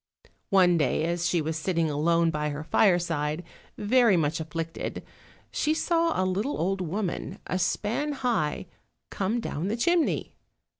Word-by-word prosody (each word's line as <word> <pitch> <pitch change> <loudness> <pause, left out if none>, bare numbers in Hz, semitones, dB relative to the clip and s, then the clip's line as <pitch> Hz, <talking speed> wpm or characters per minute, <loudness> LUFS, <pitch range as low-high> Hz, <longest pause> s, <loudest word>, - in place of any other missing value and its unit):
One 180 -4 +5
day 150 +1 +1
as 170 +1 0
she 170 - +1
was 160 +1 -2
sitting 165 0 0
alone 165 +3 +2
by 150 -1 -1
her 145 +1 -5
fireside, 165 -4 +1 0.3
very 225 -2 +4
much 155 -1 0
afflicted, 165 +1 -5 0.5
she 310 +1 +1
saw 335 - +1
a 185 - +2
little 200 +9 -1
old 190 +3 -1
woman, 185 +2 -3
a 185 - -2
span 220 +11 -1
high, 235 - -1 0.5
come 205 +5 -1
down 175 -6 -3
the 220 +3 -1
chimney. 345 +6 +1
175 Hz, 145 wpm, -27 LUFS, 160-215 Hz, 0.5 s, One